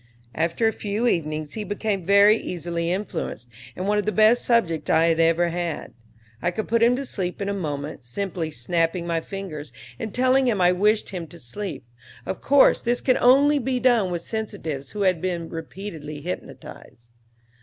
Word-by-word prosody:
After 170 +7 +1
a 220 - +1
few 210 +3 -2
evenings 155 -7 -1
he 215 - -4
became 205 -2 -2
very 200 +2 +7
easily 170 -4 -3
influenced 180 - -4 0.3
and 185 +2 -4
one 210 0 +2
of 210 - -3
the - - +2
best 220 +3 +4
subjects 180 -10 +1
I 160 +1 +4
had 165 0 +1
ever 165 +1 +3
had. 170 -2 -4 0.5
I 175 - +1
could 215 +5 -4
put 230 +1 +1
him 235 +2 +5
to 275 +2 -4
sleep 180 -7 -4
in 200 - -3
a 200 - -1
moment, 150 -7 -4
simply 165 +5 -4
snapping 165 +6 -1
my 165 -1 -1
fingers 160 -8 -7 0.3
and 220 - -4
telling 255 +2 +3
him 215 -5 +1
I 180 0 +5
wished 210 +4 +2
him 175 -4 -6
to 170 - -12
sleep; 170 - -6 0.4
of - - -4
course 280 +1 +5
this 240 0 0
can 255 - +3
only 285 +4 +5
be 255 0 -1
done 240 -7 +3
with 175 -1 -3
sensitives 165 - -4
who 210 - -5
have 185 -4 +2
been 175 -3 -3
repeatedly 160 -3 -7
hypnotized. 120 -7 -9
185 Hz, 185 wpm, -24 LUFS, 165-220 Hz, 0.5 s, very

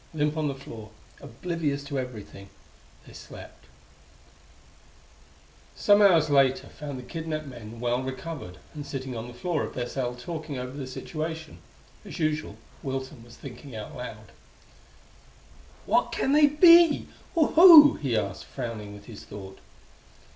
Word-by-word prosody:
Limp 150 0 0
on 155 -1 -1
the 140 - -3
floor, 115 -5 -10 0.3
oblivious 160 -5 -3
to 140 -1 -3
everything, 105 -6 -8 0.6
they - - -15
slept.... - - -12 2.1
Some 205 0 +4
hours 170 -6 +5
later 135 -2 +3
found 145 -3 -7
the 125 - -8
kidnapped 155 +3 -5
men 115 -4 -10
well 120 +1 0
recovered 130 - -7 0.2
and 150 -2 -6
sitting 135 -3 -6
on 115 +1 -6
the 120 - -10
floor 160 +4 -2
of - - -5
their 125 -1 -3
cell 125 -2 -3
talking 155 +1 -6
over 125 0 -5
their 135 -2 -6
situation. 160 - -6 0.4
As - - -9
usual, 155 -1 -1 0.3
Wilson 130 -3 -5
was 120 0 -15
thinking 130 -1 -10
out 105 -1 -8
loud. 110 -4 -9 1.5
"What - - +2
can 270 - -1
they 295 +1 +6
be? 335 +1 +6 0.3
or 320 -3 +3
who?" 320 -4 +10
he 130 -6 -2
asked, 100 -2 -3
frowning 105 -3 -6
with 105 - -14
his 115 -4 -11
thought. 95 -1 -10
135 Hz, 145 wpm, -26 LUFS, 120-160 Hz, 2.1 s, who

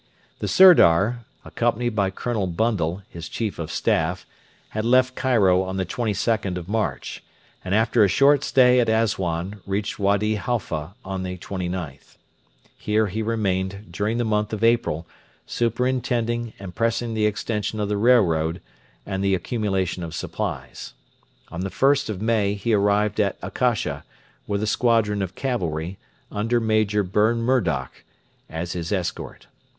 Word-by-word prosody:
The - - -3
Sirdar, 120 - +6 0.2
accompanied 120 0 -1
by 100 -2 +2
Colonel 105 0 -2
Bundle, 95 -2 -1
his 85 -1 -9
Chief 110 -6 -3
of 80 -1 -4
Staff, 85 - 0 0.4
had 110 - -3
left 130 +2 +3
Cairo 110 -9 +3
on 95 0 -4
the 95 - -1
22nd 105 -3 -1
of 90 -1 -7
March, 100 - -2 0.4
and 95 +2 -1
after 110 +1 +3
a - - +5
short 140 - +4
stay 125 -1 +5
at 120 - +2
Assuan 100 -4 -1
reached 100 +2 -2
Wady 100 +2 +1
Halfa 95 -6 -3
on 95 -1 -4
the 90 0 -4
29th. 90 -5 -6 0.6
Here 110 +1 +1
he 105 +2 -3
remained 100 -3 -2
during 105 +6 -1
the 120 - 0
month 105 0 0
of 110 +1 -3
April, 115 -8 +2 0.4
superintending 120 -1 -1
and 95 -2 -9
pressing 115 +2 -1
the 110 -1 +2
extension 105 0 -2
of 105 - 0
the 105 - -1
railroad 90 -8 +3 0.5
and 95 0 -3
the 100 -1 +3
accumulation 95 -2 -2
of 85 -1 -6
supplies. - - -5 0.6
On 85 - -5
the 95 - -2
1st 140 +3 +2
of 105 -1 -4
May 105 -3 +1
he 105 +3 -1
arrived 105 +1 +2
at 100 -2 +1
Akasha, - - -1 0.4
with 100 0 -1
a - - +1
squadron 110 -2 +2
of 95 -1 -4
cavalry, 90 - -3 0.3
under 115 +4 0
Major 110 -2 +1
Burn 110 +5 +1
Murdoch, 90 - 0 0.5
as 85 +2 -4
his 85 -2 -4
escort. 90 -4 -4
105 Hz, 145 wpm, -23 LUFS, 95-115 Hz, 0.6 s, Sirdar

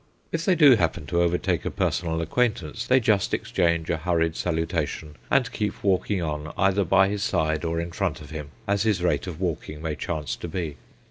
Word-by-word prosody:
If 165 +1 -2
they 185 - +4
do 145 -7 +7
happen 85 -4 0
to 85 +4 +1
overtake 85 0 +1
a - - -1
personal 80 -2 -1
acquaintance, 115 0 -1
they 130 +1 +5
just 105 -5 +2
exchange 85 -2 0
a 85 - +1
hurried 80 -1 0
salutation, 80 -3 -2
and 130 -3 +2
keep 105 -2 -3
walking 95 -1 +1
on, 75 -1 -3
either 100 0 +3
by 95 +2 +4
his 100 0 -2
side, 80 -5 0
or 85 0 -1
in 85 +1 -4
front - - -2
of 75 -1 -12
him, 75 -2 -6 0.2
as 100 0 +1
his 105 -5 +1
rate 75 -2 +1
of 85 -3 -6
walking 80 -4 -3
may 80 0 -3
chance 75 -1 -3
to - - -6
be. 80 -3 -4
85 Hz, 200 wpm, -25 LUFS, 80-100 Hz, 0.2 s, do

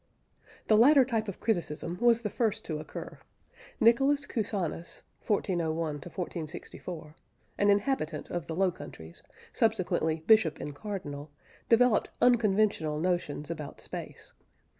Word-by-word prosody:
The 215 - +4
latter 270 +3 +7
type 225 -3 -1
of 200 - -6
criticism 175 -4 -2
was 235 -1 +4
the 210 - -2
first 220 -3 -1
to 155 -2 -3
occur. 155 - -8 0.6
Nicholas 275 +5 +4
Cusanus 195 - -3 0.2
(1401 175 -6 0 0.2
1464), 160 0 -6 0.5
an 205 - +4
inhabitant 200 - 0
of 175 -5 -3
the 160 - -4
Low 190 +1 +2
Countries, 85 - -11 0.3
subsequently 160 0 +1
bishop 215 -9 +4
and 145 - -5
cardinal, 145 -5 -6 0.4
developed 235 -1 +4
unconventional 210 -10 +3
notions 170 -3 -1
about 150 -3 -7
Space. - - -8
185 Hz, 120 wpm, -29 LUFS, 155-220 Hz, 0.6 s, latter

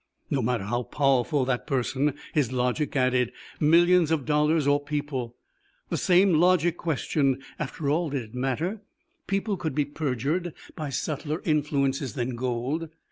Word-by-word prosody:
No 135 - +1
matter 120 -3 0
how 120 +5 -1
powerful 135 +1 +1
that 125 -1 -1
person, 135 +1 0 0.2
his 140 -6 +1
logic 130 +5 -1
added. 130 -2 +2 0.3
Millions 170 +2 +5
of 160 -4 0
dollars 150 0 +2
or 145 0 +2
people? 145 -5 -3 0.5
the - - -1
same 185 +1 +4
logic 175 0 +4
questioned. 140 -4 0 0.2
After 145 +1 -4
all, 160 +3 +1
did 135 -3 -2
it 110 0 -15
matter? 140 - -2 0.5
People 195 +1 -1
could 160 -6 -3
be 145 -1 +2
perjured 145 +4 -2 0.2
by 155 -2 -4
subtler 150 +4 -3
influences 140 - 0
than 125 0 -2
gold. 130 +6 -2
145 Hz, 145 wpm, -26 LUFS, 130-160 Hz, 0.5 s, Millions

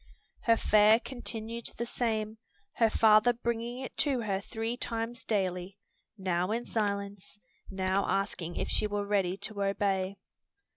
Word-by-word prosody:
Her 230 -1 +5
fare 215 +1 +5
continued 235 -2 -5
the 235 - -2
same, 220 -2 -1 0.4
her 225 -1 +5
father 215 +2 +5
bringing 235 0 -3
it - - -7
to 270 -5 +1
her 200 -3 -1
three 225 +3 -3
times 230 -1 -4
daily, 185 -2 -1 0.4
now 180 -1 0
in 235 +3 -1
silence, 200 -2 -3 0.3
now 190 0 0
asking 180 -4 -1
if - - -2
she 215 - +1
were 205 -1 -2
ready 195 -2 +1
to 205 0 -4
obey. 195 -1 0
210 Hz, 140 wpm, -30 LUFS, 195-230 Hz, 0.4 s, Her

